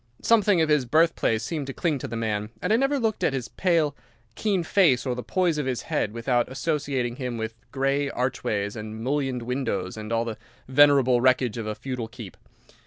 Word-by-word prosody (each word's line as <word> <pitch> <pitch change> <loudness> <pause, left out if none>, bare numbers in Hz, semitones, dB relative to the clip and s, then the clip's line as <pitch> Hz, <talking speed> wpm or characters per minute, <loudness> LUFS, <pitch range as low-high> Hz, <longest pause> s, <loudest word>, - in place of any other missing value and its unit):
Something 210 -6 +4
of 160 - +1
his 150 -4 +3
birthplace 155 -6 +2
seemed 145 +2 -3
to 135 - -5
cling 160 -6 0
to - - -5
the 115 - -6
man, 105 -2 -2
and - - 0
I - - +6
never 275 +4 +2
looked 225 -3 -1
at - - +2
his 130 -3 -3
pale, 165 -6 +1 0.4
keen 195 - 0
face 160 -8 +3
or 125 - 0
the 125 - -4
poise 175 +1 0
of 140 - -2
his 125 -2 -2
head 105 - -1
without 120 +2 0
associating 135 -4 -2
him 125 -3 -4
with 110 0 -4 0.2
grey 135 +1 0
archways 105 -5 -2
and 110 0 -7
mullioned 135 -2 -1
windows 115 -7 -2
and 105 +1 -6
all 115 0 +1
the 115 -2 -5 0.3
venerable 130 -2 +5
wreckage 125 -3 +2
of 110 - -4
a 105 - -3
feudal 125 0 -5
keep. 115 -5 -10
130 Hz, 200 wpm, -25 LUFS, 115-150 Hz, 0.4 s, I